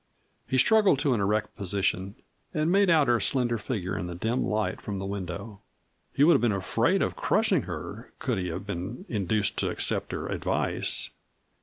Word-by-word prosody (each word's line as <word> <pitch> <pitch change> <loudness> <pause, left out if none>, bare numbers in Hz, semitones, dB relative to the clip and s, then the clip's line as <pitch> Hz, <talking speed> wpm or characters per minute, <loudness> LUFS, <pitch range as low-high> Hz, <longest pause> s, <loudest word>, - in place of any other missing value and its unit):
He 130 - 0
struggled 205 +3 +5
to 140 -1 +1
an 110 - 0
erect 105 +2 0
position 100 0 -1 0.4
and 155 +2 +1
made 200 0 +4
out 155 -4 +4
her 120 -1 +3
slender 120 -3 +1
figure 100 -5 -3
in 90 -1 -3
the 90 - -6
dim 115 +8 -1
light 105 0 -1
from 100 -2 -4
the 95 - -4
window. 100 +1 -6 0.5
He 140 - +2
would 170 +3 +7
have - - +3
been 120 -2 +3
afraid 100 -2 +1
of - - -2
crushing - - +2
her - - -7
could - - -1
he 90 - -2
have 85 +3 -5
been 100 +4 -5
induced 105 -1 0
to - - 0
accept - - 0
her - - -4
advice. - - 0
105 Hz, 185 wpm, -27 LUFS, 95-130 Hz, 0.5 s, would